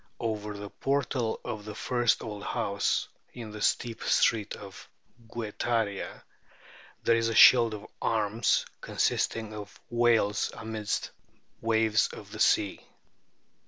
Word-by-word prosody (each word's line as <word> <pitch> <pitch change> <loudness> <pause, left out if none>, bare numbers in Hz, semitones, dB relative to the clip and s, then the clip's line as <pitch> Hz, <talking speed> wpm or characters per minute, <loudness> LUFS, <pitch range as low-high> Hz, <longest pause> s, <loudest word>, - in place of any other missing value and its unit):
Over 105 -2 -3
the 100 0 -8
portal 130 -4 -1
of 105 -1 -5
the 105 0 -8
first 120 +1 +1
old 105 -2 -6
house 100 0 0 0.3
in 115 -3 -8
the 105 0 -8
steep 115 +2 0
street 110 -2 +2
of 100 -2 -11 0.4
Guetaria 110 -2 -2 0.8
there 115 - +4
is 115 0 +1
a 115 - -2
shield 115 -1 +8
of 105 - -9 0.2
arms 110 0 +1 0.2
consisting 110 -1 -1
of 105 -1 -9
whales 115 -4 +2
amidst 110 -1 -3 0.5
waves 110 -1 +3
of - - -11
the - - -8
sea. 100 -2 +2
110 Hz, 125 wpm, -29 LUFS, 105-115 Hz, 0.8 s, shield